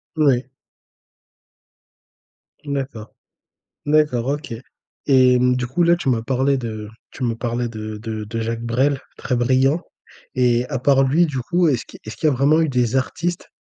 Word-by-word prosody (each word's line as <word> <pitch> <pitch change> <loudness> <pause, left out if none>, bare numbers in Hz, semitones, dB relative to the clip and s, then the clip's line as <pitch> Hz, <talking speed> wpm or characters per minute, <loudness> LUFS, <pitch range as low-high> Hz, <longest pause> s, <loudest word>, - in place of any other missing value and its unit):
Ouais. 135 -5 +2 2.2
D'accord. 135 -6 -5 0.7
D'accord, 150 -5 +2
OK. 145 -1 -3 0.5
Et 130 -2 +5
hem, 125 0 +3
du 125 -1 -2
coup, 140 +8 0
là, 170 0 +5
tu 170 -6 -2
m'as 120 -3 +1
parlé 135 +3 +1
de 110 -4 -5 0.2
tu 130 - -7
me 120 -2 +1
parlais 120 +1 -2
de 110 -2 -6
de 110 0 -5
de 110 +2 -5
Jacques 115 +1 -3
Brel, 130 +4 +1 0.2
très 125 - -2
brillant. 130 +6 +2 0.5
Et 125 -1 +2
à 130 - -2
part 135 +1 +4
lui, 150 +6 +3
du 145 -5 -3
coup, 175 +7 +1
est-ce 130 -6 0
qui - - -13
est-ce 110 - -7
qu'il 155 - 0
y - - +1
a - - -1
vraiment 145 +5 +3
eu 160 - +1
des 125 -2 0
artistes, 170 +6 -2
130 Hz, 170 wpm, -21 LUFS, 120-145 Hz, 2.2 s, Et